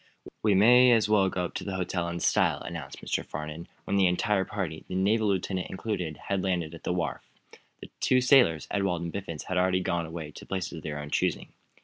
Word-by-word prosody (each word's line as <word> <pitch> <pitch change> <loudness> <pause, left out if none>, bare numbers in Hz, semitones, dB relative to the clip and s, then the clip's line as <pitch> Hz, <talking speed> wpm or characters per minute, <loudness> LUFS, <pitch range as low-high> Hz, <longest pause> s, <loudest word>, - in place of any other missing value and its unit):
"We 105 -2 +3
may 125 +5 +7
as 110 -3 +3
well 100 -3 +3
go 90 -1 -2
up, - - -7
to - - -4
the 95 - -4
hotel 90 -1 -2
in 85 0 -4
style," - - +2
announced - - -7
Mr. - - -1
Farnum, 75 +2 -7 0.2
when 100 - -1
the 95 -2 +5
entire 95 +2 +1
party, 90 -6 -4
the - - -5
naval 105 +4 +2
lieutenant 95 -1 -1
included, 95 -7 -3
had 100 -2 0
landed 85 -4 -1
at 85 - -11
the - - 0
wharf. 90 -1 -2 0.6
The - - -10
two 130 - +3
sailors, 125 - +4
Ewald 95 -4 0
and 85 - -4
Biffens, 90 -6 -5
had 95 -1 -1
already 90 0 +2
gone 85 -2 -1
away 80 -2 -7
to - - -11
places 95 -2 -3
of 80 - -7
their 75 -1 -5
own 75 0 -7
choosing. - - 0
95 Hz, 220 wpm, -28 LUFS, 85-100 Hz, 0.6 s, may